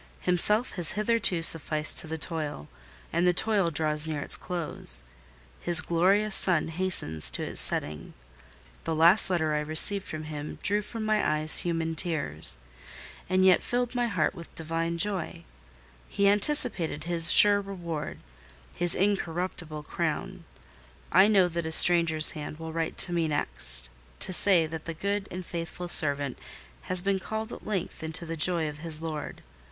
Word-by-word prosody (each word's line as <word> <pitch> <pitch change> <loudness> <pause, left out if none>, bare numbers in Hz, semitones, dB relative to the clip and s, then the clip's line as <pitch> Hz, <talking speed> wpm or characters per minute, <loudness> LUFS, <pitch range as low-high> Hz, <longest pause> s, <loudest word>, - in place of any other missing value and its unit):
Himself 210 +6 +3
has 175 -3 +3
hitherto 210 -5 0
sufficed 155 -1 +3
to - - -6
the 160 +1 -6
toil, 155 - -6 0.5
and 170 +2 0
the 180 - +1
toil 205 -3 0
draws 155 0 -2
near 155 -2 -4
its - - -1
close: 155 - -2 0.6
his 175 -1 +5
glorious 195 +5 +1
sun 175 -4 +2
hastens 160 - +2
to - - -2
its - - -4
setting. 75 0 -4 0.7
The 160 - -4
last 170 +6 +5
letter 160 -4 -1
I 150 - -1
received 160 +6 0
from 155 0 -7
him 150 -1 -8
drew 205 +1 +1
from 215 +1 -7
my 215 -1 0
eyes 155 0 +4
human 165 -1 -3
tears, 140 - -1 0.7
and 185 0 +1
yet 185 -1 +4
filled 245 0 -3
my 245 -1 -1
heart 180 -8 -2
with 170 -3 -13
divine 165 +1 -4
joy: 175 -3 -5 0.7
he 200 - 0
anticipated 205 - +1
his 165 -1 +7
sure 205 -1 +7
reward, 170 -6 -7 0.6
his 175 0 +1
incorruptible 175 -5 -4
crown. - - -5 0.7
I 190 +4 +5
know 195 -4 +3
that 170 -1 -5
a - - -6
stranger's 165 -2 +5
hand 150 -1 -9
will 160 0 -9
write 165 -1 -4
to 175 - +2
me 170 -2 -1
next, 60 - +2 0.3
to 185 - +1
say 180 -3 +5
that 160 0 -9
the 165 - -7
good 200 +3 -4
and 180 0 -8
faithful 170 +1 -7
servant 145 -5 +1 0.5
has 185 -1 +2
been 195 0 -1
called 220 +3 -6
at - - -12
length 195 -5 -5
into 160 +2 -4
the 165 0 -6
joy 165 0 -1
of 150 0 -9
his 160 -1 -1
Lord. 155 -2 -7
170 Hz, 160 wpm, -26 LUFS, 155-190 Hz, 0.7 s, his